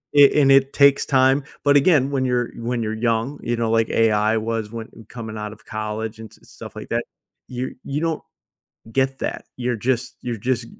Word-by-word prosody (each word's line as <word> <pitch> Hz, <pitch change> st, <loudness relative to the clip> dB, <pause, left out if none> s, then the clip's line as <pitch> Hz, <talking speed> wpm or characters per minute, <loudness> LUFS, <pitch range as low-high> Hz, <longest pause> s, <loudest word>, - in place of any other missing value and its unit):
a 145 Hz, +1 st, +7 dB
and 135 Hz, -, +4 dB
it 135 Hz, 0 st, +5 dB
takes 140 Hz, -1 st, +5 dB
time, 135 Hz, 0 st, +3 dB, 0.2 s
but 145 Hz, 0 st, +5 dB
again, 140 Hz, -2 st, +4 dB
when 135 Hz, -2 st, 0 dB
you're 125 Hz, -1 st, 0 dB, 0.2 s
when 125 Hz, -1 st, -1 dB
you're 110 Hz, 0 st, -2 dB
young, 115 Hz, +6 st, -1 dB
you 120 Hz, -, -1 dB
know, 115 Hz, -1 st, 0 dB
like 115 Hz, 0 st, +2 dB
AI 110 Hz, 0 st, +2 dB
was 110 Hz, -1 st, -3 dB
when 115 Hz, -1 st, -6 dB, 0.2 s
coming 110 Hz, -2 st, -7 dB
out 105 Hz, 0 st, -5 dB
of 105 Hz, -, -19 dB
college 110 Hz, +1 st, -4 dB
and 110 Hz, -1 st, -10 dB
stuff -, -, -11 dB
like -, -, -8 dB
that, -, -, 0 dB, 0.5 s
you 125 Hz, +1 st, -4 dB
you 140 Hz, +1 st, -3 dB
don't 165 Hz, -2 st, -1 dB, 0.7 s
get 135 Hz, +1 st, +1 dB
that. -, -, -4 dB
You're 125 Hz, -1 st, -1 dB
just 125 Hz, -1 st, 0 dB
you're 120 Hz, -2 st, -3 dB
just 120 Hz, -2 st, 0 dB
120 Hz, 195 wpm, -22 LUFS, 110-135 Hz, 0.7 s, a